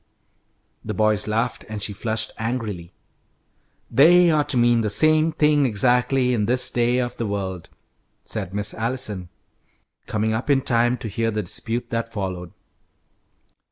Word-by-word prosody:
The 110 Hz, -1 st, -4 dB
boys 110 Hz, 0 st, +1 dB
laughed, 115 Hz, +3 st, -1 dB
and 105 Hz, -2 st, -5 dB
she 105 Hz, -, -3 dB
flushed 110 Hz, +1 st, -2 dB
angrily. 110 Hz, -7 st, -4 dB, 1.0 s
"They 170 Hz, +7 st, +6 dB
ought 150 Hz, -2 st, +1 dB
to 130 Hz, -, 0 dB
mean 120 Hz, -1 st, +4 dB
the 110 Hz, -, -1 dB
same 155 Hz, +7 st, +3 dB
thing 150 Hz, -2 st, +3 dB
exactly 125 Hz, +3 st, +2 dB
in 105 Hz, -4 st, 0 dB
this 125 Hz, +1 st, +1 dB
day 120 Hz, +1 st, +1 dB
of 125 Hz, -1 st, -2 dB
the 115 Hz, -, -2 dB
world," 95 Hz, -4 st, -4 dB, 0.5 s
said 100 Hz, -5 st, -4 dB
Miss 105 Hz, +1 st, -3 dB
Allison, 110 Hz, -6 st, -2 dB, 0.8 s
coming 110 Hz, +1 st, -1 dB
up 115 Hz, +6 st, -3 dB
in 135 Hz, -2 st, +4 dB
time 120 Hz, 0 st, +1 dB
to 115 Hz, -, -6 dB
hear 115 Hz, +2 st, -1 dB
the 105 Hz, -1 st, -2 dB
dispute 115 Hz, +6 st, -4 dB
that 115 Hz, 0 st, -2 dB
followed. 95 Hz, -5 st, -5 dB
115 Hz, 150 wpm, -22 LUFS, 105-125 Hz, 1.0 s, They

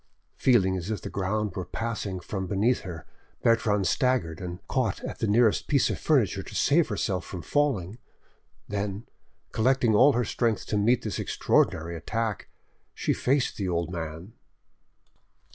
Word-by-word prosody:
Feeling 95 Hz, -8 st, +3 dB
as 90 Hz, +1 st, -4 dB
if 110 Hz, -, -3 dB
the -, -, -6 dB
ground 100 Hz, 0 st, -1 dB
were 95 Hz, -, -3 dB
passing 105 Hz, -3 st, -4 dB
from 95 Hz, +1 st, -4 dB
beneath 105 Hz, +7 st, +2 dB
her, 85 Hz, -5 st, -8 dB, 0.4 s
Bertrande 105 Hz, -4 st, +2 dB
staggered, 125 Hz, -, +1 dB
and 90 Hz, -1 st, -5 dB
caught 125 Hz, -7 st, 0 dB
at -, -, -6 dB
the 110 Hz, -, 0 dB
nearest 110 Hz, +1 st, +3 dB
piece 140 Hz, -3 st, +2 dB
of -, -, -4 dB
furniture 110 Hz, -, +2 dB
to -, -, -10 dB
save 160 Hz, +3 st, +3 dB
herself 95 Hz, -3 st, -2 dB
from 90 Hz, 0 st, -7 dB
falling; 120 Hz, -8 st, 0 dB, 0.7 s
then, 100 Hz, +2 st, -3 dB, 0.5 s
collecting 125 Hz, 0 st, +2 dB
all 130 Hz, +7 st, +6 dB
her 120 Hz, 0 st, +1 dB
strength 115 Hz, +1 st, 0 dB
to -, -, -2 dB
meet 120 Hz, +4 st, +2 dB
this 105 Hz, -6 st, -3 dB
extraordinary 85 Hz, +2 st, +1 dB
attack, 110 Hz, +6 st, -3 dB, 0.5 s
she -, -, 0 dB
faced 135 Hz, +1 st, 0 dB
the 95 Hz, -3 st, -2 dB
old 85 Hz, 0 st, -1 dB
man. 85 Hz, +4 st, -6 dB
105 Hz, 155 wpm, -27 LUFS, 95-120 Hz, 0.7 s, all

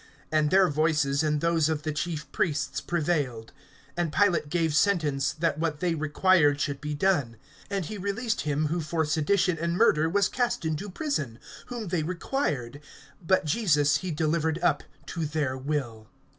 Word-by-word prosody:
And 155 Hz, -1 st, +2 dB
their 190 Hz, +2 st, +5 dB
voices 150 Hz, -2 st, +1 dB
and 150 Hz, -1 st, 0 dB
those 165 Hz, -2 st, +2 dB
of 155 Hz, -2 st, -2 dB
the 155 Hz, -, -1 dB
chief 155 Hz, 0 st, -3 dB
priests 150 Hz, -3 st, -1 dB
prevailed. 145 Hz, -9 st, -1 dB, 0.4 s
(24)And 175 Hz, -3 st, -1 dB
Pilate 170 Hz, -5 st, +2 dB
gave 165 Hz, -1 st, 0 dB
sentence, 150 Hz, -6 st, +2 dB
that 155 Hz, -1 st, -1 dB
what 160 Hz, -2 st, -1 dB
they 175 Hz, -2 st, +1 dB
required 155 Hz, -1 st, +3 dB
should 145 Hz, -1 st, -2 dB
be 150 Hz, 0 st, -3 dB
done. 145 Hz, -9 st, +1 dB, 0.3 s
(25)And 195 Hz, -3 st, -2 dB
he 210 Hz, +7 st, -6 dB
released 220 Hz, +4 st, -2 dB
him 150 Hz, +1 st, 0 dB
who 165 Hz, +3 st, -1 dB
for 160 Hz, +1 st, -1 dB
sedition 165 Hz, +3 st, +1 dB
and 170 Hz, +1 st, -1 dB
murder 160 Hz, -8 st, +4 dB
was 200 Hz, +2 st, +2 dB
cast 245 Hz, -8 st, -1 dB
into 160 Hz, +6 st, -2 dB
prison, 185 Hz, -, -3 dB, 0.3 s
whom 235 Hz, -6 st, -5 dB
they 175 Hz, -2 st, 0 dB
required; 150 Hz, -, -2 dB, 0.4 s
but 185 Hz, 0 st, +2 dB
Jesus 150 Hz, -5 st, +3 dB
he 185 Hz, -, -5 dB
delivered 160 Hz, 0 st, 0 dB
up 155 Hz, -5 st, +3 dB, 0.2 s
to 165 Hz, +2 st, -4 dB
their 145 Hz, -4 st, -1 dB
will. 130 Hz, -5 st, -4 dB
155 Hz, 165 wpm, -27 LUFS, 150-180 Hz, 0.4 s, their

